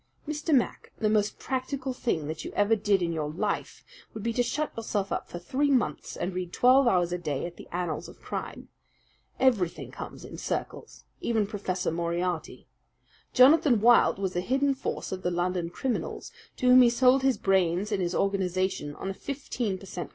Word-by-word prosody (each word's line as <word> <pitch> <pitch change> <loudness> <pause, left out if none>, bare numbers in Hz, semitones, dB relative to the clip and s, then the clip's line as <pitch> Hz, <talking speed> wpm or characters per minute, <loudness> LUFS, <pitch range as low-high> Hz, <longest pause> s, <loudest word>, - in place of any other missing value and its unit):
"Mr. 305 +2 -3
Mac, 265 -5 +1
the 215 -2 +1
most 210 -1 +1
practical 260 0 -3
thing 200 -11 -1
that 155 +1 -5
you - - -6
ever 205 +2 +3
did 205 -3 +1
in 170 -1 -1
your 155 -2 -2
life 155 - -3 0.3
would 215 - -6
be 230 0 -1
to 245 - +1
shut 295 +5 -2
yourself 210 -3 -2
up - - -3
for - - -6
three 265 +12 0
months 260 -4 0
and 180 - -3
read 180 -1 -4
twelve 255 +4 +5
hours 175 -5 +2
a 180 - -2
day 150 -4 -2
at 175 0 -7
the - - -12
annals 175 -3 -3
of - - -15
crime. - - -6 0.7
Everything 215 -10 +1
comes - - -8
in - - -9
circles - - -5 0.2
even 225 -3 +1
Professor 195 -4 -2
Moriarty. 170 +1 -2 0.7
Jonathan 270 -2 +6
Wild 235 -1 +5
was 190 -2 -2
the 175 - 0
hidden 275 +7 +1
force 265 - -4
of 190 -1 -4
the 180 - 0
London 175 0 -1
criminals, 245 +8 -3 0.3
to - - -3
whom 250 0 +8
he 245 - +7
sold 255 +2 +4
his 265 -1 +2
brains 190 +1 +1
and 200 -2 0
his 175 0 -1
organization 185 -5 -1
on 195 - -4
a - - -5
fifteen 245 -5 -3
per 195 - -12
cent. 175 -4 -6
200 Hz, 190 wpm, -28 LUFS, 175-250 Hz, 0.7 s, whom